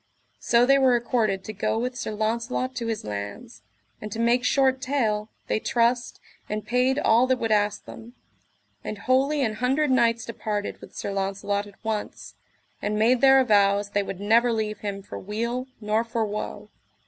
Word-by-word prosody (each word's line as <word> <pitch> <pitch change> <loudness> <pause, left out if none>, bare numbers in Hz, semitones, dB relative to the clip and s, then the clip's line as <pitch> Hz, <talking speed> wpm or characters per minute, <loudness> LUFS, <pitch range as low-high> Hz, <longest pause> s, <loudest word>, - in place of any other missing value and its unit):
So 235 +1 +3
they 275 +2 +5
were 260 -2 +4
accorded 225 -5 0
to 215 - -6
go 210 +2 -1
with 250 +2 -2
Sir - - -4
Launcelot 235 +4 -2
to 240 -2 -4
his 225 -2 -3
lands; 105 +2 -6 0.4
and 210 - -6
to 220 - -5
make 235 +2 +2
short 265 0 +2
tale, 220 -6 0 0.2
they - - 0
trussed, 240 +2 0 0.3
and 210 -1 -3
paid 250 +4 +1
all 240 -3 +4
that 260 0 +2
would 225 -2 -2
ask 210 -1 +1
them; 235 +2 -11 0.7
and 210 - -5
wholly 270 +6 +1
an 220 -3 0
hundred 265 +4 +1
knights 235 -2 +2
departed 210 -3 -4
with - - -13
Sir - - -4
Launcelot 200 +1 -2
at 200 - -18
once, 220 -1 -4 0.5
and 210 +1 -1
made 235 +3 +3
their 270 0 +7
avows 205 -3 +3
they 205 - +1
would 195 -2 -6
never 230 +4 +3
leave 215 -2 -2
him 200 -1 -5
for - - -8
weal 235 +5 -3
nor 215 +1 0
for 230 -1 -2
woe. 210 0 -6
225 Hz, 180 wpm, -25 LUFS, 210-250 Hz, 0.7 s, their